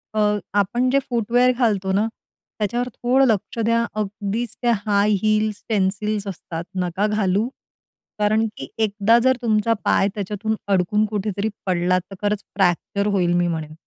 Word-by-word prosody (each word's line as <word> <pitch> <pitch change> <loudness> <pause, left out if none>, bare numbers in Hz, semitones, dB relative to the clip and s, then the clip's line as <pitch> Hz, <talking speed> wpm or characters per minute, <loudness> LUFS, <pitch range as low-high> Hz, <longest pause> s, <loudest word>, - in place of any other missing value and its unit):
अ, 215 - +1 0.4
आपण 240 +6 +1
जे 275 +2 +3
फूटवेअर 245 +2 +3
घालतो 200 -6 +1
ना, 210 +3 +2 0.5
त्याच्यावर 240 +4 -1
थोडं 260 +3 +3
लक्ष 225 +1 -1
द्या. 230 +1 +2 0.2
अगदीच 210 +3 -3
त्या 240 -1 +3
हाय 205 0 +3
हील्स 215 -1 +1
पेन्सिल्स 205 +1 0
असतात. 170 -3 -6 0.2
नका 180 +4 0
घालू. 210 +1 +1 0.7
कारण 215 +2 +2
की - - -6
एकदा 215 +1 +3
जर 260 +1 +3
तुमचा 225 0 +2
पाय 195 - +3
त्याच्यातून 210 +2 -2
अडकून 200 +2 +2
कुठेतरी 205 0 -2 0.2
पडला, 180 0 +2
तर 185 +2 -12
खरंच 205 0 -1
फ्रॅक्चर 195 +2 +1
होईल 175 -3 +2
मी 175 0 +2
म्हणेन. 160 -2 -4
210 Hz, 145 wpm, -22 LUFS, 195-225 Hz, 0.7 s, जे